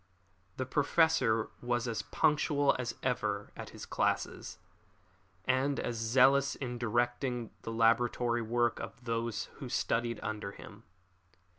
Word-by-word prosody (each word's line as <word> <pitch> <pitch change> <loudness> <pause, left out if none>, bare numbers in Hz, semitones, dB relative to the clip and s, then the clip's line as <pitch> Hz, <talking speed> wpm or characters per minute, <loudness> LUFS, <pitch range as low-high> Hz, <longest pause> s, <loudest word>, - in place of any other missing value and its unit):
The 130 - -1
Professor 140 -5 +2
was 120 0 0
as 115 -2 -1
punctual 145 -2 +2
as 125 - -3
ever - - -1
at - - -7
his - - -9
classes, - - -1 0.9
and 130 +2 +1
as 120 - -2
zealous 135 +4 +4
in 125 -3 -5
directing 120 +1 -1
the 115 - -5
laboratory 115 +1 +2
work 120 +1 +1
of 120 - -8
those 115 -2 -1 0.2
who 135 -4 -6
studied 115 0 0
under 105 -2 -4
him. 100 +1 -12
120 Hz, 125 wpm, -32 LUFS, 115-130 Hz, 0.9 s, zealous